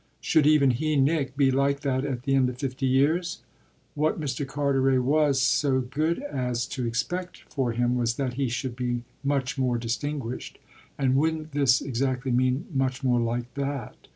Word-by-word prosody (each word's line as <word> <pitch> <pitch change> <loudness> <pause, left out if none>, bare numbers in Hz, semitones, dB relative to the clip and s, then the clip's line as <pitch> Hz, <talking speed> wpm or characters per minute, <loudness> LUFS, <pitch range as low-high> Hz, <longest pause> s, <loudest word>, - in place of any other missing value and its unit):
Should 150 -2 +3
even 150 -3 +5
he, 155 +5 0
Nick, 140 -1 +1
be 135 -2 +4
like 140 +1 +1
that 130 -2 0
at 130 -4 -3
the 135 - 0
end 130 -2 +3
of 125 - -7
fifty 135 0 -2
years? 155 +7 +1 0.5
What 155 +2 0
Mr. 140 -2 -3
Carteret 135 -2 +1
was 145 0 +3
so 130 0 +2
good 155 - -1
as 125 - -2
to 125 -4 -3
expect 175 +10 -3
for 130 -5 0
him 120 +1 +1
was 115 -2 0
that 130 -2 -2
he 135 0 -1
should 120 +1 -3
be 120 -1 -2 0.2
much 140 -1 -1
more 125 -2 +1
distinguished; 120 +2 -4 0.4
and 130 -2 +2
wouldn't 155 +2 0
this 135 -2 +3
exactly 130 0 -1
mean 130 +2 +1
much 130 0 -1
more 125 -2 +3
like 120 +1 -2
that? 140 -4 -5
135 Hz, 175 wpm, -26 LUFS, 125-145 Hz, 0.5 s, even